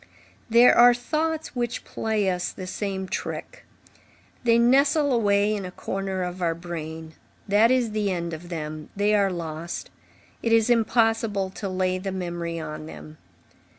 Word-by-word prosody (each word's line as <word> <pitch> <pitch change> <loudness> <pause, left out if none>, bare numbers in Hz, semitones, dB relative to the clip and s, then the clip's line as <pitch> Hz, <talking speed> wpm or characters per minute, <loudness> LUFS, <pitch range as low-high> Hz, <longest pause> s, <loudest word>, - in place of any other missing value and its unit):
There 235 +2 +7
are 245 0 +7
thoughts 315 +5 -2
which 240 -1 -2
play 215 -3 -1
us 180 -1 -1
the 185 - -8
same 190 0 -3
trick; - - -5 0.8
they 230 -1 +4
nestle 280 +4 +4
away 205 -2 +2
in 200 - -4
a 180 - -5
corner 190 0 -3
of 180 +1 -5
our 165 -2 +1
brain; 160 -2 -7 0.3
that 210 +3 +5
is 250 -3 +2
the 210 -1 0
end 170 -2 -2
of 170 +2 -8
them; 155 -2 -5
they 205 +1 +2
are 200 -2 +3
lost; 165 -1 -5 0.5
it 230 - 0
is 225 +1 +4
impossible 225 -4 +2
to 195 +1 -5
lay 185 0 0
the 195 +1 -4
memory 170 -2 -4
on 155 -1 -6
them. 155 -1 -11
195 Hz, 155 wpm, -25 LUFS, 175-230 Hz, 0.8 s, There